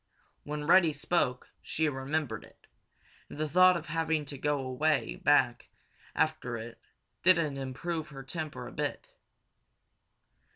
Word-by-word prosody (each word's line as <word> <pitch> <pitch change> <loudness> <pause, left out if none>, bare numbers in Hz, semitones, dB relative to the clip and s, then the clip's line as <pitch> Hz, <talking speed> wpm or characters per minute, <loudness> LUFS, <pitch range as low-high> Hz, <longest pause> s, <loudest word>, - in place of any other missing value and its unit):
When 150 0 -4
Reddy 170 -1 +5
spoke, 145 -4 -1
she 160 0 0
remembered 135 -4 -2
it, - - -19 0.6
and - - -9
the 155 0 -1
thought 185 +3 +6
of 165 - -7
having 160 -1 0
to 140 0 -7
go 145 -2 0
way 145 - +1
back - - +3 0.5
after 140 -6 0
it 115 +1 -9 0.4
didn't 165 -6 +3
improve 155 +5 -4
her 135 -2 -9
temper 155 +2 -5
a - - -8
bit. - - -4
150 Hz, 130 wpm, -30 LUFS, 135-160 Hz, 0.6 s, thought